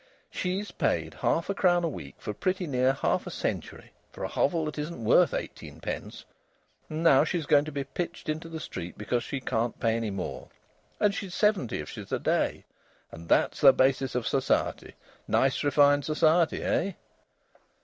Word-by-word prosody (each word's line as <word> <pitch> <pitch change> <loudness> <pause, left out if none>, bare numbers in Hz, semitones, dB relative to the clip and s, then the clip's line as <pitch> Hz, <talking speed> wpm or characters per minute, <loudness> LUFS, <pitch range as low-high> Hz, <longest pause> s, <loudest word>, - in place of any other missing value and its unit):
She's 190 +3 -3
paid - - -1
half 165 - 0
a 200 - 0
crown 175 -3 +3
a - - +2
week 155 - -7
for 105 - -5
pretty 185 - -1
near 130 -3 +2
half 135 - -1
a - - -3
century - - -4 0.2
for - - -8
a - - 0
hovel 160 +2 +1
that 155 0 -5
isn't 150 -5 -5
worth - - +5
eighteen - - -6
pence, - - -6 0.6
and 155 +1 -3
now 140 -4 +6
she's 165 -1 -2
going 145 0 +4
to 155 - -6
be 140 -1 -3
pitched 170 +6 -5
into 155 +2 -3
the 160 -1 -6
street 90 - -7
because 120 +3 -1
she 140 - -4
can't 120 -2 -2
pay 115 -1 +1
any 115 -2 -2
more. 95 -2 -5 0.5
And 210 -1 +3
she's 195 -3 -5
seventy 205 - +1
if 75 - -9
she's - - -9
a - - +1
day! - - 0 0.5
And 85 +1 -11
that's - - +2
the 135 -2 +9
basis 135 0 +2
of 125 -2 -1
society. 135 -1 0 0.3
Nice 135 0 +2
refined 145 0 +4
society, 155 +2 +2
eh?" 195 - 0
145 Hz, 180 wpm, -28 LUFS, 130-170 Hz, 0.6 s, the